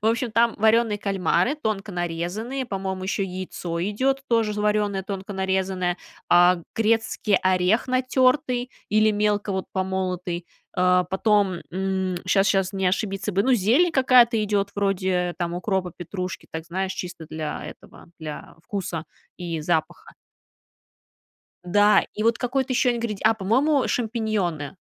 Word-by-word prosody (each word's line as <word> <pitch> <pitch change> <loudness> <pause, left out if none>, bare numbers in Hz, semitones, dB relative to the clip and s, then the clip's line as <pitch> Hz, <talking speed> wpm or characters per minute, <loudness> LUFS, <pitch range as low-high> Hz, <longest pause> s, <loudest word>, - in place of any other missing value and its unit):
В - - +1
общем, 230 +1 +1
там 230 +1 +3
варёные 220 0 +3
кальмары, 200 - +1
тонко 215 -6 -3
нарезанные, 180 +9 -3
по-моему, 190 -2 -4
еще 195 +1 -1
яйцо 180 -2 -5
идет 260 +8 0
тоже 225 -3 +2
варёное, 210 -2 +1
тонко 195 +1 -6
нарезанное, 190 -1 -1 0.3
а, 175 0 +5 0.2
грецкий 225 -2 +1
орех 185 +6 +2
натертый 255 0 +1 0.2
или 215 +1 +4
мелко 210 -1 0
вот 190 0 -2
помолотый, 185 -2 -2 0.3
а, 180 0 +4
потом, 195 -2 +1
м, 190 0 -1
щас 195 +1 +4
щас 195 -1 +1
не 190 -1 0
ошибиться 195 +1 -1
бы,- 195 +2 +2
ну, 260 0 +3
зелень 245 - +3
какая-то 250 -5 +5
идет, 200 -1 0
вроде, 185 -3 0
там, 175 0 -2
укропа, 185 0 -1
петрушки, 180 0 -6
так, 160 0 -5
знаешь, 190 +2 -2
чисто 175 -4 -7
для 155 -1 -5
этого, - - -12
для 155 -2 -8
вкуса 175 -5 -4 0.3
и 170 -3 -4
запаха. 160 0 -2 1.5
Да. 205 +4 +4
И 215 - -3
вот 230 0 +3
какой-то 260 +1 -1
еще 245 0 +2
ингреди 230 -4 -4
а, 220 - +5
по-моему, 255 +8 +2
шампиньоны, 215 - -2
195 Hz, 135 wpm, -24 LUFS, 180-225 Hz, 1.5 s, а